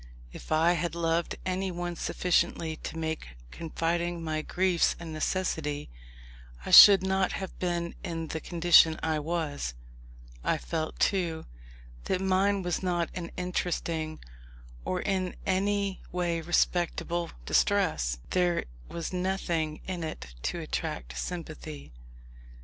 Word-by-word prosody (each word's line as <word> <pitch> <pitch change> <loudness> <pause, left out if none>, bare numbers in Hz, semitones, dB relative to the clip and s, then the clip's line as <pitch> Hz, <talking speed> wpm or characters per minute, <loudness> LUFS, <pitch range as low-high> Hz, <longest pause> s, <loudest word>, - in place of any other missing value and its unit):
If - - -11
I 160 +2 +4
had 170 -1 -2
loved 165 0 0
anyone 180 -2 -2
sufficiently 170 -2 0
to 160 - -7
make 160 - -4
confiding 170 +1 -2
my 155 -1 -1
griefs 180 +1 +2
a 170 - -7
necessity, 155 - -2 0.7
I - - -4
should 200 -2 +11
not 190 -1 +1
have 190 - -6
been 175 -1 -1
in 165 -2 -4
the 160 - -3
condition 165 -1 +5
I 160 -1 +1
was. 150 - -2 0.7
I - - +1
felt, 155 - -3
too, 170 -5 +1 0.6
that 185 - 0
mine 190 +1 +2
was 175 -1 -1
not 175 -3 0
an 170 -2 -5
interesting, 170 -3 -2 0.7
or 180 - -1
in 185 -2 -1
any 200 +1 0
way 175 -2 -1
respectable 175 0 0 0.2
distress. - - +2
There 175 -2 +2 0.2
was 170 +1 -5
nothing 175 -4 -1
in 180 -3 -4
it 65 - -6 0.2
to - - -4
attract 60 0 -4
sympathy. 155 - -6
170 Hz, 120 wpm, -29 LUFS, 160-180 Hz, 0.7 s, should